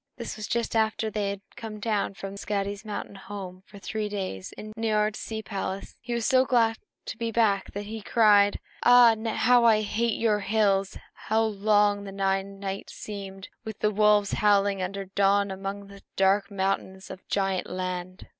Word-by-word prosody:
It 235 Hz, -, -5 dB
was 215 Hz, -1 st, -6 dB
just 235 Hz, -1 st, -1 dB
after 220 Hz, 0 st, +1 dB
they 205 Hz, -1 st, -1 dB
had 200 Hz, -1 st, -5 dB
come 220 Hz, -2 st, -7 dB
down 210 Hz, -2 st, -1 dB
from 195 Hz, 0 st, -7 dB
Skadi's 200 Hz, 0 st, -3 dB
mountain 210 Hz, -2 st, -6 dB
home 190 Hz, -2 st, -8 dB
for -, -, -25 dB
their 200 Hz, -, -11 dB
three 215 Hz, +1 st, -3 dB
days 185 Hz, -, -5 dB
in 215 Hz, 0 st, -9 dB
Niörd's 215 Hz, -2 st, 0 dB
sea 220 Hz, -1 st, -5 dB
palace, 195 Hz, -2 st, -4 dB
and -, -, -28 dB
he 240 Hz, 0 st, -3 dB
was 235 Hz, -1 st, -1 dB
so 260 Hz, -1 st, +4 dB
glad 230 Hz, -4 st, +2 dB, 0.3 s
to -, -, -6 dB
be 230 Hz, -1 st, -2 dB
back 210 Hz, -4 st, +1 dB
that 205 Hz, +1 st, -5 dB
he 220 Hz, +1 st, -6 dB
cried, 205 Hz, -2 st, +4 dB, 0.2 s
"Ah, 245 Hz, -2 st, +7 dB, 0.2 s
how 245 Hz, +1 st, +4 dB
I 220 Hz, -2 st, +5 dB
hate 225 Hz, +2 st, 0 dB
your 215 Hz, -2 st, +2 dB
hills! 200 Hz, -2 st, +1 dB, 0.2 s
How 220 Hz, +1 st, 0 dB
long 205 Hz, -1 st, +2 dB
the 195 Hz, -, -7 dB
nine 195 Hz, 0 st, -1 dB
nights 195 Hz, 0 st, -5 dB
seemed, 195 Hz, -2 st, -8 dB
with 220 Hz, -2 st, -7 dB
the 210 Hz, -, +1 dB
wolves 210 Hz, -1 st, +3 dB
howling 200 Hz, -2 st, +2 dB
until 195 Hz, +2 st, -4 dB
dawn 200 Hz, 0 st, +3 dB
among 195 Hz, +1 st, -5 dB
the 200 Hz, 0 st, -14 dB
dark 195 Hz, +1 st, +3 dB
mountains 190 Hz, -1 st, -2 dB
of 190 Hz, 0 st, -11 dB
Giant 195 Hz, -2 st, -1 dB
Land! 185 Hz, 0 st, -5 dB
205 Hz, 185 wpm, -27 LUFS, 195-220 Hz, 0.3 s, Ah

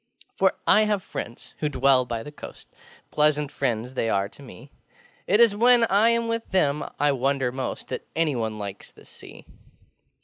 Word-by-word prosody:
For -, -, +2 dB
I 215 Hz, 0 st, +5 dB
have 205 Hz, -3 st, -1 dB
friends 115 Hz, -, -8 dB
who 150 Hz, -, -1 dB
dwell 135 Hz, -2 st, +3 dB
by 115 Hz, -2 st, -4 dB
the 150 Hz, -, -9 dB
coastŌĆö 145 Hz, -, -11 dB, 0.5 s
Pleasant 150 Hz, -1 st, +1 dB
friends 125 Hz, -2 st, -2 dB
they 115 Hz, -3 st, -1 dB
are 100 Hz, -1 st, +1 dB
to 145 Hz, -, -17 dB
me! 135 Hz, 0 st, -13 dB, 0.6 s
It 205 Hz, +4 st, +3 dB
is 230 Hz, -3 st, +5 dB
when 240 Hz, +2 st, +5 dB
I 210 Hz, +4 st, +4 dB
am 235 Hz, 0 st, +1 dB
with 230 Hz, 0 st, -3 dB
them 150 Hz, -6 st, +1 dB, 0.2 s
I 145 Hz, 0 st, +3 dB
wonder 135 Hz, -1 st, 0 dB
most 130 Hz, 0 st, -5 dB
That -, -, -5 dB
anyone 120 Hz, -10 st, -1 dB
likes 100 Hz, -1 st, -7 dB
the -, -, -19 dB
Sea. -, -, -13 dB
140 Hz, 175 wpm, -24 LUFS, 125-200 Hz, 0.6 s, I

